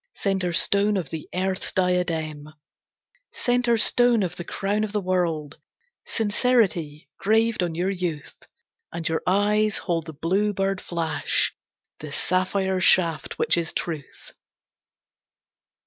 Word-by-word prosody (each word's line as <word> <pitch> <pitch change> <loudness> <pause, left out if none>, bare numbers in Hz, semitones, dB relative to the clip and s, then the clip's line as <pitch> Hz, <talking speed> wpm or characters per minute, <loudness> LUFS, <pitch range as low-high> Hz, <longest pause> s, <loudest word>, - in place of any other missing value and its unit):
Centre 190 -3 0
Stone 200 +4 +3
of 180 - -4
the 160 -2 -6
earth's 190 +1 -2
diadem!..... 165 -5 -1 0.8
Centre 245 -1 +1
Stone 235 0 +4
of 180 -1 -3
the 175 - -6
Crown 200 +4 -2
of 215 -1 -4
the 210 - +1
World, 170 -6 -1 0.5
"Sincerity" 205 - 0
graved 225 +1 +2
on 170 -2 -2
your 180 +3 0
youth! 175 -6 -4 0.6
And 165 -1 -3
your 160 0 -1
eyes 210 +3 +2
hold 170 -2 -2
the 160 - -7
blue 190 +8 0
bird 195 0 -1
flash, 165 -2 -1 0.5
The 150 -1 -8
sapphire 185 +3 0
shaft, 165 -5 +2
which - - +2
is 170 -1 -2
truth. 155 -5 -6
185 Hz, 125 wpm, -24 LUFS, 165-205 Hz, 0.8 s, Stone